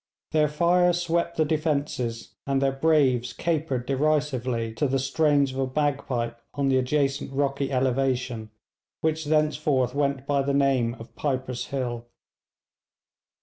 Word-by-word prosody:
Their 155 -1 +3
fire 175 +4 +3
swept 170 0 -1
the 155 - +3
defences, 145 -7 -2
and 135 -1 +1
their 135 0 +2
braves 135 -5 +2
capered 150 -7 -1
derisively 130 -5 0
to 145 +6 0
the 135 +1 +1
strains 140 0 +2
of 130 - -5
a 135 - +1
bagpipe 130 -4 -1
on 140 -1 +1
the 130 - +3
adjacent 135 +1 0
rocky 140 0 -1
elevation, 130 -3 0 0.5
which 160 0 0
thenceforth 150 -4 +1
went 140 -2 0
by 140 -1 +1
the 140 0 0
name 130 -4 +2
of 115 -2 -13
'Piper's 130 -3 -2
Hill.' 120 -3 -3
140 Hz, 135 wpm, -26 LUFS, 130-150 Hz, 0.5 s, Their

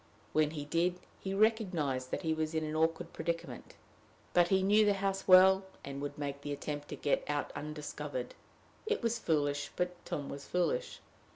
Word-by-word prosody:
When 155 -1 +3
he 150 -2 -5
did, 175 +4 +1 0.2
he 195 0 -3
recognized 180 - +1
that - - -3
he 160 -1 +1
was 155 0 -2
in 160 - +1
an 155 0 -3
awkward 165 +2 0
predicament. 165 +1 -4 0.6
But 175 -1 +5
he 190 +1 +3
knew 210 +3 +5
the 205 -1 +3
house 195 0 -2
well, 190 +1 +8 0.2
and 140 0 -5
would 145 - -4
make 140 -1 -4
the 145 - -5
attempt 145 +1 -4
to - - -5
get 145 - +1
out 145 0 -1
undiscovered. 150 - -5 0.5
It 440 - 0
was 230 0 +1
foolish, 145 -6 0
but 180 0 -2
Tom 145 -1 -4
was 140 0 -7
foolish. 335 - -1
165 Hz, 180 wpm, -33 LUFS, 145-190 Hz, 0.6 s, well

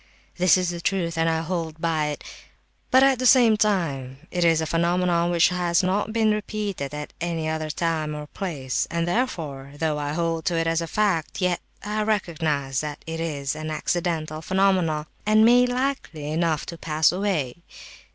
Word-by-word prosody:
This 180 -1 +5
is 180 -1 0
the 170 -1 -6
truth, 170 -3 -1
and 165 0 +2
I 160 0 0
hold 165 -2 -4
by 160 -2 0
it; 150 - -5 0.7
but 260 0 +6
at 270 -2 +4
the 255 - +3
same 240 -3 +6
time 160 -12 0
it 175 -1 0
is 165 -1 +4
a 160 - 0
phenomenon 170 +1 +1
which 175 0 +4
has 175 -1 +1
not 195 +4 0
been 220 -1 +2
repeated 210 -8 -3
at 150 0 -6
any 165 -2 -2
other 155 0 -2
time 155 -1 -1
or 150 0 -6
place; 145 -6 -3
and 170 0 -1
therefore, 155 - -2
though 155 -1 0
I 145 0 -2
hold 165 -1 -1
to 170 - +1
it 165 - +1
as 165 0 +1
a 165 - -3
fact, 190 -5 0
yet 180 -2 0 0.2
I 210 +1 -2
recognize 160 -10 -1
that 150 -1 -6
it 165 0 -5
is 145 -4 -2
an 155 0 -5
accidental 155 -1 -2
phenomenon, 185 -4 +1 0.2
and 215 +1 +5
may 245 +1 +6
likely 245 - -2
enough 160 -1 0 0.2
pass 155 -1 +3
away. 180 -9 -1
165 Hz, 180 wpm, -24 LUFS, 155-190 Hz, 0.7 s, but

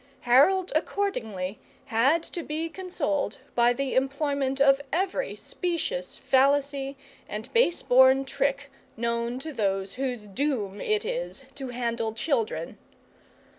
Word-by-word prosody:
Harold 325 +10 +4
accordingly 225 - -2 0.3
had 270 +8 +3
to 345 - -5
be 315 +1 -3
consoled 320 - -2 0.2
by 240 0 +4
the 270 +1 -2
employment 275 0 0
of 275 0 +5
every 385 - -1
specious 335 - -3
fallacy 275 0 +2 0.3
and 215 +4 -6
base 460 -8 +3
born 260 +1 +6
trick 280 +1 -1 0.3
known 235 +1 -1
to 310 +4 -6
those 195 -4 -1
whose 250 -4 -3
doom 210 -3 -2
it 430 0 0
is - - -3
to 270 0 -6
handle 235 -2 -2
children. 225 - -1
270 Hz, 120 wpm, -27 LUFS, 235-305 Hz, 0.3 s, born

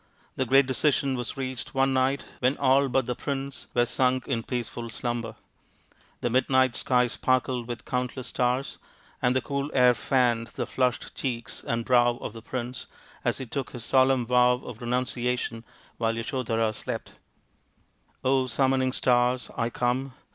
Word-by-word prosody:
The 130 - -1
great 135 +2 +6
decision 135 0 +1
was 120 0 -4
reached 130 0 -5
one 135 0 +3
night 130 +1 +1
when 130 +3 +2
all 135 0 +4
but 130 0 +2
the 125 - -1
prince 135 +1 -5
were 120 0 +4
sunk 130 +1 +1
in 120 -4 0
peaceful 120 0 -4
slumber. 120 0 -3 0.9
The 120 - 0
midnight 130 0 +3
sky 125 -1 +3
sparkled 125 0 0
with 120 -1 -6
countless 125 0 -2
stars, 125 +2 -1 0.4
and 125 +1 +2
the 130 - +2
cool 140 0 -2
air 125 -1 +6
fanned 120 -2 +1
the - - -2
flushed 125 -2 -1
cheeks 120 -4 -4
and 115 0 -2
brow 120 -1 +4
of - - -6
the 115 - -9
prince 125 +1 -5 0.4
as - - +1
he 130 - -5
took 135 +2 -4
his 120 -2 -4
solemn 130 -2 +3
vow 125 +1 +5
of 125 -2 -9
renunciation, 125 -1 -1 0.4
while 115 -1 +1
Yasodhara 115 -2 -1
slept. - - -5 0.7
" 130 0 -2
summoning 130 0 +2
stars, 125 0 +2
I 115 - 0
come 125 +2 -1
125 Hz, 155 wpm, -27 LUFS, 120-130 Hz, 0.9 s, great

